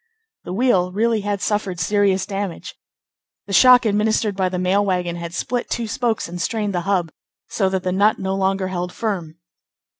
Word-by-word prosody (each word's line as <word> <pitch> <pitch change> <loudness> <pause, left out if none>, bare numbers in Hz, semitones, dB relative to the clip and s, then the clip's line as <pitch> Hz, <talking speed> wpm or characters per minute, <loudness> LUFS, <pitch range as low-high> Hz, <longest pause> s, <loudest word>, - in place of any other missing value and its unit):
The 180 - -5
wheel 190 -5 +2
really 220 +2 +1
had 200 -1 -2
suffered 200 -4 -1
serious 195 +2 +1
damage. 195 -3 -5 0.7
The 200 - -6
shock 250 +5 +7
administered 215 0 +1
by 190 -1 0
the 180 - -3
mail 185 +3 +2
wagon 180 -3 -1
had 170 -1 -6
split 245 +7 -3
two 235 -1 -2
spokes 230 0 -1
and 175 +1 -6
strained 210 +1 -1
the 175 - -1
hub, 180 -5 +1 0.4
so 195 -3 0
that 190 -1 -2
the 185 - -1
nut 200 +3 +3
no 190 0 -2
longer 195 0 0
held 180 -1 -3
firm. 175 -7 -4
195 Hz, 180 wpm, -21 LUFS, 180-210 Hz, 0.7 s, shock